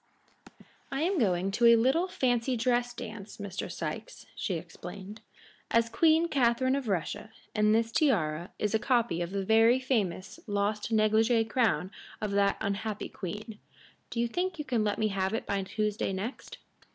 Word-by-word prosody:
"I 275 +3 -1
am 365 0 +1
going 190 -4 +1
to 235 +4 +4
a 235 - +8
little 265 +10 +2
fancy 250 -6 0
dress 245 +1 +1
dance, 215 -3 -8
Mr. 200 -2 -5
Sikes," - - -6
she - - -2
explained, 200 +2 -8 0.5
"as 230 0 +3
Queen 320 +6 +4
Catharine 260 -2 +2
of 275 -3 -3
Russia, 190 +2 -2 0.2
and 210 0 +3
this 225 0 +1
tiara 175 - +1
is 210 -1 -1
a 220 - +3
copy 235 -8 +1
of 170 - -2
the 195 0 -3
very 225 +4 +5
famous 205 -8 -2
lost 205 +1 -1
negligée 220 +1 +3
crown 225 -6 +1 0.3
of 210 -1 -2
that 200 0 +2
unhappy 210 +1 -3
queen. 210 +3 -7 0.5
Do 235 - -4
you 235 - +2
think 355 +6 -2
you 300 - -4
can 240 -5 +1
let 205 -1 0
me 215 -1 +1
have 195 +1 -1
it - - -3
by 200 -1 -1
Tuesday 210 +1 -2
next?" 205 +7 -6
220 Hz, 165 wpm, -29 LUFS, 200-245 Hz, 0.5 s, a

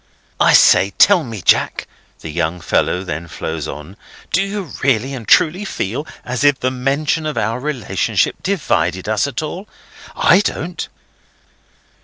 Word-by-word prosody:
"I - - +5
say! 100 +1 +5
Tell 185 -4 +5
me, 110 - -7
Jack," - - +2 0.3
the 80 - -7
young 85 +2 -2
fellow 90 +2 0
then 85 -2 -5
flows 80 -1 -5
on: 75 +8 -9 0.4
"do 190 - +3
you 195 -4 -4
really 130 0 +1
and 120 -5 -7
truly 175 +5 +4
feel 145 - -4 0.2
as 125 +2 -3
if 145 -2 +4
the 130 - 0
mention 140 +5 -1
of 150 - -4
our 115 +4 -1
relationship 135 -5 -1
divided 95 - -1
us 110 +5 +1
at 140 +2 -4
all? 180 +7 -6 0.5
I - - +5
don't." 180 -4 -3
130 Hz, 150 wpm, -18 LUFS, 95-155 Hz, 0.5 s, I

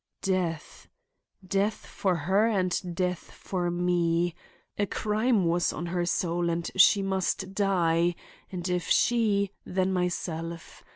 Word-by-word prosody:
"Death. 180 -5 -2 0.6
Death 200 +3 0
for 190 -3 -1
her 190 +7 +2
and 185 -4 -1
death 180 0 0
for 180 -2 -3
me! 175 -1 +1 0.5
A 205 - +1
crime 215 0 +1
was 170 +1 +2
on 175 - -5
her 175 0 -1
soul 175 0 0
and 170 0 -2
she 195 +1 +6
must 190 0 -1
die, 175 -4 +2 0.4
and 180 -1 -4
if 180 -2 -1
she, 210 -5 +2
then 185 +1 0
myself. 170 -2 -3
180 Hz, 125 wpm, -28 LUFS, 170-195 Hz, 0.6 s, she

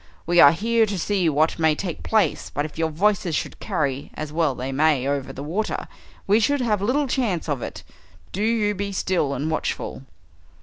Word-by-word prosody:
We 175 +1 +3
are 145 - +9
here 225 +5 +2
to 200 -1 -3
see 185 -2 +1
what 155 +3 +1
may 160 -1 +3
take 175 0 -5
place, 220 -2 +1
but 145 +1 -2
if 155 - -9
your 160 0 0
voices 180 0 +1
should - - -4
carry, 140 -9 -2
as 150 -1 -6
well 160 -5 +1
they 130 +2 -4
may, 140 -1 +2
over 140 -1 -2
the 140 - -7
water, 190 +9 -2 0.4
we 205 +3 +4
should 285 +6 +2
have 215 -5 +1
little 265 +8 +1
chance 230 - -1
of 145 -5 -2
it. - - -6 0.5
Do 195 - -4
you 215 -1 +1
be 200 0 -4
still 175 -7 0
and 150 +4 -2
watchful." 155 - -3
170 Hz, 200 wpm, -23 LUFS, 150-210 Hz, 0.5 s, are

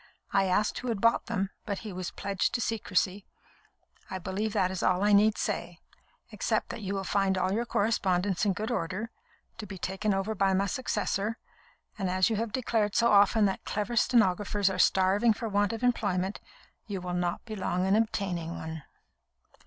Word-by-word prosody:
I 195 -1 +4
asked 190 +3 +1
who 250 - -6
had 225 -4 -1
bought 230 +3 +2
them, 200 -4 -1
but 200 -2 -3
he 210 - -5
was 185 0 -4
pledged 200 +2 -2
to - - 0
secrecy. 200 -3 -1 0.8
I 190 - -3
believe 190 +4 -3
that 185 0 +1
is 190 - -4
all 185 +1 +2
I 210 0 +4
need 210 +1 +5
say, 175 0 -3 0.5
except - - -1
that - - -6
you 200 0 -3
will 195 - -2
find 195 0 +1
all 185 0 +1
your 235 +3 -1
correspondence 195 -4 +1
in 200 -2 +2
good 215 +5 -3
order, 210 +3 -3 0.5
to 210 - -6
be 190 0 -7
taken 190 +4 -2
over 195 +2 0
by 195 -2 +2
my 195 +1 +2
successor; 215 0 -1 0.6
and 190 -2 -1
as 185 +4 +2
you 220 - 0
have 225 0 -2
declared 220 -4 0
so 235 0 +4
often 205 +1 +5
that 195 - -1
clever 210 +3 -3
stenographers 205 -4 +2
are 185 - -4
starving 195 +6 +4
for 225 - -5
want 205 0 +1
of 225 +1 -5
employment, 200 -6 0 0.5
you 200 -3 -3
will 180 0 -5
not 175 -1 -2
be 220 -2 -6
long 185 -2 -1
in 190 +1 +3
obtaining 190 -6 -1
one." 160 0 -6
200 Hz, 190 wpm, -29 LUFS, 185-215 Hz, 0.8 s, need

